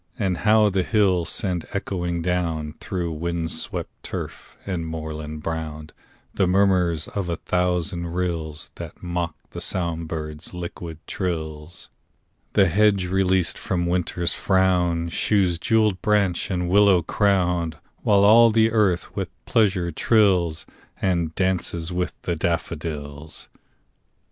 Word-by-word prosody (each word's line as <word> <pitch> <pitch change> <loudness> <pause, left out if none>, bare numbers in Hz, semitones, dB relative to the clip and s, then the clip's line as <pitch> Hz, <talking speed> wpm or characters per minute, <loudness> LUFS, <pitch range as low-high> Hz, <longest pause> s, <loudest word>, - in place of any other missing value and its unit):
And 95 -4 0
how 105 0 +5
the 95 0 +1
hills 95 -5 +2
send 90 -4 -2
echoing 90 -4 -2
down, 85 -4 -1
Through 90 -3 -3
wind 85 +1 -2
swept - - -3
turf - - -7
and 85 -4 -3
moorland 80 -1 -6
brown, 80 -1 -4 0.4
The 95 - +2
murmurs 90 -4 +2
of 100 -4 -3
a 85 - 0
thousand 90 0 -1
rills 85 -3 -3
That - - -9
mock 85 -2 -2 0.2
the - - -6
song 85 -2 -1
birds' 75 +1 -6
liquid 85 -2 -6
trills! 80 -3 -4 0.6
The 100 -2 +5
hedge 100 +1 +3
released 95 -1 +1
from 85 -2 -1
Winter's 85 0 0
frown 90 -3 +2
Shews 90 -2 +1
jewelled 105 -3 +2
branch 100 -4 +1
and 90 -2 -1
willow 100 -1 +5
crown; 90 -4 +1 0.3
While 100 -1 +4
all 115 +3 +8
the 110 0 +3
earth 100 -6 +1
with - - -2 0.2
pleasure 95 -6 +2
trills, 90 -5 +2 0.3
And 85 -4 0
'dances 90 -2 -1
with 90 0 -2
the 85 - -1
daffodils. 80 -2 -4
90 Hz, 125 wpm, -23 LUFS, 80-95 Hz, 0.6 s, all